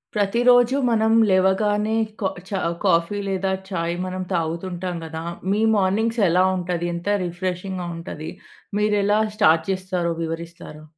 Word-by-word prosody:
ప్రతి 205 Hz, +2 st, +1 dB
రోజు 245 Hz, +1 st, +6 dB
మనం 220 Hz, -1 st, +2 dB, 0.2 s
లేవగానే 205 Hz, +3 st, +2 dB, 0.2 s
కా 190 Hz, -, +1 dB, 0.2 s
చా 195 Hz, -1 st, -2 dB, 0.3 s
కాఫీ 170 Hz, +2 st, +2 dB
లేదా 190 Hz, 0 st, -1 dB, 0.2 s
చాయ్ 170 Hz, -3 st, -2 dB
మనం 185 Hz, 0 st, -4 dB
తాగుతుంటాం 175 Hz, +2 st, -3 dB
కదా! 160 Hz, 0 st, -6 dB, 0.3 s
మీ 210 Hz, +2 st, +1 dB
మార్నింగ్స్ 215 Hz, +4 st, +1 dB
ఎలా 180 Hz, +2 st, +4 dB
ఉంటది, 175 Hz, -1 st, -2 dB
ఎంత 170 Hz, +3 st, -7 dB, 0.2 s
రిఫ్రెషింగ్‌గా 180 Hz, +1 st, -4 dB
ఉంటది? 155 Hz, -2 st, -7 dB, 0.5 s
మీరు 210 Hz, 0 st, +2 dB
ఎలా 205 Hz, +1 st, +3 dB, 0.2 s
స్టార్ట్ 165 Hz, -7 st, +4 dB
చేస్తారో, 185 Hz, -2 st, -2 dB
వివరిస్తారా? 165 Hz, -1 st, -6 dB
185 Hz, 130 wpm, -22 LUFS, 170-205 Hz, 0.5 s, రోజు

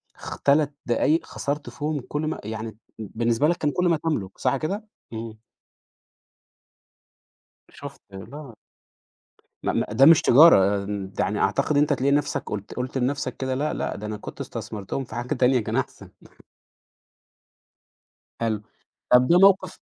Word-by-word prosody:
خ -, -, -8 dB
3 145 Hz, 0 st, +2 dB
دقايق 150 Hz, +7 st, +1 dB
خسرت 145 Hz, +1 st, -4 dB
فيهم 150 Hz, -1 st, -3 dB
كل 150 Hz, -, -3 dB
ما 155 Hz, -, -3 dB
يعني 110 Hz, 0 st, -6 dB, 0.2 s
بالنسبة 115 Hz, +5 st, 0 dB
لك 170 Hz, +1 st, +1 dB
كان 150 Hz, -, 0 dB
كل 180 Hz, +4 st, 0 dB
ما 165 Hz, -, +3 dB
تملك 145 Hz, -, -3 dB
صح 140 Hz, -, 0 dB
كده؟ 195 Hz, -, -4 dB, 0.3 s
إمم. 110 Hz, -1 st, -6 dB, 2.3 s
شُفت -, -, -11 dB
لا. 120 Hz, +6 st, -10 dB, 1.1 s
م -, -, -1 dB
م -, -, +1 dB
ده 125 Hz, +6 st, +5 dB
مش 160 Hz, 0 st, +7 dB
تجارة، 100 Hz, -, +6 dB, 0.3 s
يعني 105 Hz, +1 st, 0 dB
أعتقد 95 Hz, +9 st, +1 dB
إن 145 Hz, -, +4 dB
أنت 150 Hz, 0 st, +2 dB
تلاقي 140 Hz, 0 st, +1 dB
نفسك 145 Hz, 0 st, 0 dB
قُلت 100 Hz, -1 st, -5 dB
قُلت 125 Hz, +2 st, -4 dB
لنفسك 135 Hz, +2 st, -2 dB
كده 130 Hz, -1 st, -2 dB
لأ، 150 Hz, +3 st, -1 dB
لأ، -, -, -3 dB
ده 105 Hz, -, -7 dB
أنا 105 Hz, 0 st, -4 dB
كنت -, -, -10 dB
استثمرتهم 105 Hz, +6 st, -5 dB
في 110 Hz, -, -10 dB
حاجة 120 Hz, +4 st, -2 dB
تانية 125 Hz, 0 st, +3 dB
كان 110 Hz, -, -4 dB
أحسن. -, -, -4 dB, 2.3 s
حلو. 110 Hz, -2 st, -1 dB, 0.5 s
طب، 125 Hz, 0 st, +8 dB
ده 175 Hz, -, +6 dB
موقِف 195 Hz, 0 st, +4 dB
130 Hz, 150 wpm, -24 LUFS, 110-150 Hz, 2.3 s, طب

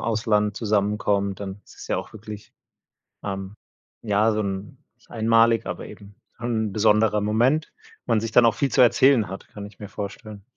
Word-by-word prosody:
Ausland 105 Hz, -2 st, 0 dB
zusammenkommt, 100 Hz, -2 st, 0 dB
dann 100 Hz, 0 st, -6 dB
ist -, -, -18 dB
es -, -, -10 dB
ja -, -, 0 dB
auch -, -, -8 dB
wirklich, 105 Hz, -1 st, -10 dB, 0.7 s
ähm, 95 Hz, 0 st, -5 dB, 0.5 s
ja, 110 Hz, +1 st, +2 dB
so 110 Hz, -, 0 dB
'n 100 Hz, 0 st, -5 dB, 0.3 s
einmalig, 115 Hz, 0 st, +3 dB
aber -, -, -5 dB
eben, 100 Hz, 0 st, -13 dB, 0.2 s
'n 110 Hz, -3 st, -2 dB
besonderer 105 Hz, 0 st, +3 dB
Moment, 120 Hz, +9 st, +1 dB, 0.3 s
wo -, -, -3 dB
man 110 Hz, -, +4 dB
sich 115 Hz, 0 st, -4 dB
dann 120 Hz, -, +6 dB
auch 115 Hz, -, +3 dB
viel 140 Hz, -2 st, 0 dB
zu -, -, +4 dB
erzählen 120 Hz, -2 st, +4 dB
hat, 95 Hz, +1 st, -8 dB
kann 100 Hz, -1 st, -9 dB
ich 105 Hz, -1 st, -14 dB
mir 105 Hz, -, -7 dB
vorstellen. 100 Hz, 0 st, -8 dB
105 Hz, 175 wpm, -24 LUFS, 100-115 Hz, 0.7 s, dann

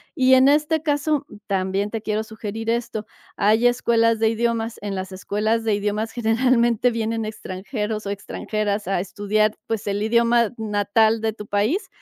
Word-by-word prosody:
y 260 Hz, 0 st, +4 dB
en 260 Hz, +1 st, +6 dB
este 300 Hz, +2 st, +2 dB
caso 290 Hz, -1 st, 0 dB, 0.2 s
también 195 Hz, +1 st, -1 dB
te 225 Hz, 0 st, -4 dB
quiero 215 Hz, 0 st, -1 dB
sugerir 220 Hz, 0 st, -6 dB
esto. 230 Hz, -2 st, -2 dB, 0.3 s
Hay 220 Hz, +4 st, +4 dB
escuelas 230 Hz, -2 st, +2 dB
de 225 Hz, -, +3 dB
idiomas, 230 Hz, 0 st, -1 dB
en 200 Hz, -1 st, -4 dB
las 190 Hz, 0 st, -5 dB
escuelas 215 Hz, +4 st, -1 dB
de 220 Hz, -2 st, +1 dB
idiomas 210 Hz, +2 st, -2 dB
generalmente 235 Hz, +1 st, +2 dB
vienen 225 Hz, 0 st, -2 dB
extranjeros 210 Hz, +1 st, -4 dB
o -, -, -3 dB
extranjeras 205 Hz, +1 st, -3 dB
a 195 Hz, -, +1 dB
estudiar, 210 Hz, +3 st, 0 dB
pues 220 Hz, -2 st, -3 dB
el 205 Hz, +1 st, -1 dB
idioma 235 Hz, 0 st, +3 dB
natal 220 Hz, +1 st, +2 dB
de 220 Hz, 0 st, 0 dB
tu 210 Hz, -1 st, -10 dB
país, 215 Hz, -, 0 dB
220 Hz, 160 wpm, -22 LUFS, 205-235 Hz, 0.3 s, en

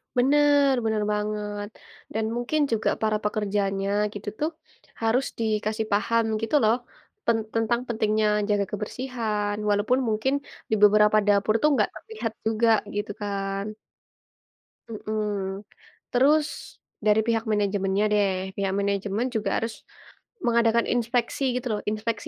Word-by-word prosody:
Benar, 285 Hz, +2 st, +4 dB
benar 220 Hz, -1 st, +1 dB
banget, 210 Hz, 0 st, -3 dB, 0.4 s
dan 220 Hz, 0 st, 0 dB
mungkin 245 Hz, +6 st, 0 dB
juga 220 Hz, -1 st, +1 dB
para 215 Hz, -1 st, +2 dB
pekerjanya 200 Hz, -2 st, -1 dB, 0.2 s
gitu 205 Hz, +1 st, -9 dB
tuh 305 Hz, +2 st, 0 dB, 0.5 s
harus 230 Hz, +4 st, +2 dB
dikasih 215 Hz, 0 st, -1 dB
paham 230 Hz, +3 st, +2 dB, 0.2 s
gitu 225 Hz, +7 st, 0 dB
loh, 220 Hz, +1 st, +5 dB, 0.5 s
pen 230 Hz, -, +3 dB, 0.2 s
tentang 225 Hz, +1 st, +1 dB
pentingnya 215 Hz, -2 st, +1 dB, 0.2 s
jaga 205 Hz, -1 st, +2 dB
kebersihan 210 Hz, -1 st, -2 dB
walaupun 205 Hz, +5 st, +2 dB
mungkin 220 Hz, +5 st, +1 dB, 0.4 s
di 220 Hz, -, +2 dB
beberapa 210 Hz, +1 st, +6 dB
dapur 205 Hz, +1 st, +3 dB
tuh 300 Hz, -, +5 dB
nggak -, -, +2 dB
terlihat 435 Hz, -, -5 dB
juga 225 Hz, +1 st, +2 dB, 0.3 s
gitu 205 Hz, 0 st, -2 dB
kan. 195 Hz, -1 st, -2 dB, 1.2 s
Heeh, 210 Hz, -3 st, -3 dB, 0.5 s
terus 290 Hz, +5 st, +1 dB, 0.3 s
dari 210 Hz, 0 st, +5 dB
pihak 225 Hz, -1 st, +1 dB
manajemennya 200 Hz, -1 st, +1 dB
deh, 200 Hz, -2 st, +3 dB, 0.2 s
pihak 195 Hz, -1 st, -1 dB
manajemen 200 Hz, +3 st, -1 dB
juga 215 Hz, -, 0 dB
harus 225 Hz, -1 st, -5 dB, 0.6 s
mengadakan 235 Hz, -1 st, +3 dB
inspeksi 245 Hz, +2 st, 0 dB
gitu 250 Hz, 0 st, -2 dB
loh, 210 Hz, -, -1 dB
inspeksi 215 Hz, 0 st, -2 dB
215 Hz, 125 wpm, -25 LUFS, 205-235 Hz, 1.2 s, beberapa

